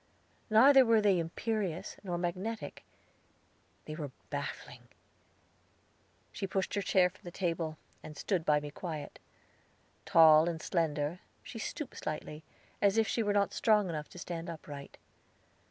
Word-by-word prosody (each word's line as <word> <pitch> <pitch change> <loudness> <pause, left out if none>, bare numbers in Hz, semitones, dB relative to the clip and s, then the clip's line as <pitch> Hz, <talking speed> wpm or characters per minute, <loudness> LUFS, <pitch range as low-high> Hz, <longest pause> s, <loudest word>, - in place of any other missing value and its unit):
Neither 265 +5 +7
were 230 -2 +4
they 200 -4 +3
imperious 190 +1 -3
nor 175 -3 -2
magnetic; 185 +6 -4 1.0
they 155 - -6
were 155 -2 -5 0.2
baffling. - - -6 1.4
She 195 - -4
pushed 190 0 -2
her 200 - 0
chair 185 -1 +4
from 180 +1 -14
the 175 - -7
table, 165 -3 -2 0.2
and 155 - -10
stood 185 -5 -1
by 150 -1 +3
me 145 0 -7
quiet. 155 -1 -6 0.9
Tall 160 0 +7
and 165 -2 -4
slender, 155 0 -1 0.2
she 225 - -8
stooped 295 +5 -5
slightly, 155 0 -5 0.4
as 200 +1 +3
if 220 -1 +3
she 235 - 0
were 205 -2 +1
not 200 -1 +2
strong 210 -4 +3
enough 150 -2 -4
to - - -13
stand 170 0 -5
upright. 145 -4 -9
175 Hz, 140 wpm, -32 LUFS, 155-205 Hz, 1.4 s, Neither